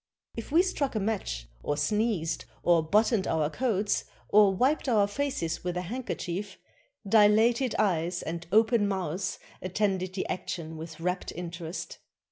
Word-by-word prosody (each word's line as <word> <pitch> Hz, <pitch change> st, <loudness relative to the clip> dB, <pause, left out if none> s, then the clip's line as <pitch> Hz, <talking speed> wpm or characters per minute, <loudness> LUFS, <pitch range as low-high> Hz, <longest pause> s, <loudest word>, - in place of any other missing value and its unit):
If 230 Hz, -, -7 dB
we 335 Hz, +4 st, +5 dB
struck 285 Hz, -9 st, -1 dB
a -, -, +1 dB
match, 195 Hz, -, -2 dB
or 145 Hz, -, -1 dB
sneezed, 175 Hz, -1 st, 0 dB, 0.2 s
or 170 Hz, -2 st, +5 dB
buttoned 210 Hz, +4 st, +2 dB
our 155 Hz, -1 st, +1 dB
coats, 210 Hz, -2 st, 0 dB, 0.2 s
or 205 Hz, -1 st, +6 dB
wiped 260 Hz, +8 st, +1 dB
our 210 Hz, -4 st, +4 dB
faces 205 Hz, -8 st, -2 dB
with 180 Hz, 0 st, -2 dB
a -, -, 0 dB
handkerchief, 200 Hz, -3 st, -4 dB, 0.5 s
dilated 220 Hz, +4 st, +4 dB
eyes 175 Hz, -4 st, +1 dB
and 170 Hz, +1 st, -5 dB
open 220 Hz, 0 st, +4 dB
mouths 190 Hz, -1 st, -2 dB, 0.2 s
attended 185 Hz, -1 st, -1 dB
the 190 Hz, -, -2 dB
action 165 Hz, -3 st, -4 dB
with 160 Hz, 0 st, -8 dB
rapt 180 Hz, +2 st, -2 dB
interest. 170 Hz, 0 st, -6 dB
190 Hz, 140 wpm, -28 LUFS, 170-220 Hz, 0.5 s, or